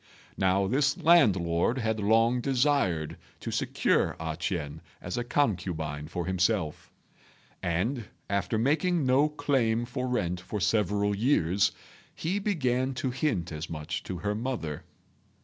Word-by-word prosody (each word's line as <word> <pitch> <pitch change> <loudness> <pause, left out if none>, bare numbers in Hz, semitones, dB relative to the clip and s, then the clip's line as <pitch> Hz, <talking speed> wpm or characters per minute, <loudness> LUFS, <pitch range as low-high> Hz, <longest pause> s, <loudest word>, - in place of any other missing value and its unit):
Now 95 +1 +2
this 140 +7 +2
landlord 100 - +4
had 110 -3 -1
long 115 +4 +3
desired 125 - +1 0.2
to - - -5
secure - - +1
A 80 -1 -3
ch'ien 80 -3 -3 0.2
as 90 - -5
a 120 - -1
concubine 85 - -1
for 85 +1 -4
himself; 95 -2 0 0.7
and, 105 +9 -1 0.2
after 100 +2 0
making 155 +6 +2
no 135 +4 +4
claim 130 -6 +1
for 125 +1 -3
rent 90 -8 -1
for 105 +3 -4
several 105 0 +1
years, 100 - +2 0.4
he 180 +5 -1
began 130 - 0
to 130 +1 -2
hint 120 - -1
as 75 +2 -5
much 75 -1 -4
to 95 - -4
her 105 +4 -1
mother. 110 - -4
105 Hz, 130 wpm, -28 LUFS, 90-130 Hz, 0.7 s, landlord